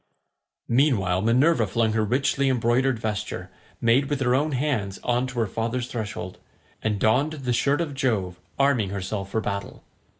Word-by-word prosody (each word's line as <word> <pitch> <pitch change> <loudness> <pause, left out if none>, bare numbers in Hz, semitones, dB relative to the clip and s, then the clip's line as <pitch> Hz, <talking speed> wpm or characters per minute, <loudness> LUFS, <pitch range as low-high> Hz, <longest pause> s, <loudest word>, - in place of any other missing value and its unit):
Meanwhile 115 -9 +2
Minerva 120 +2 +3
flung 110 +2 +1
her 110 -1 +1
richly 135 +4 +1
embroidered 125 +1 +2
vesture, 110 -2 -4 0.3
made 125 +5 +3
with 145 -2 -1
her 125 -1 +2
own 145 +3 +1
hands, 125 -8 -1
on 125 +1 +1
to 130 -1 -8
her - - +2
father's 115 +4 -2
threshold, 105 -6 -5 0.4
and 105 -2 -1
donned 130 +9 +2
the 130 -5 -2
shirt 140 +6 +2
of 155 -4 -3
Jove, 105 -10 -1 0.2
arming 135 -8 +2
herself 95 0 -4
for 110 - -1
battle. 100 -2 -5
120 Hz, 160 wpm, -25 LUFS, 105-135 Hz, 0.4 s, Minerva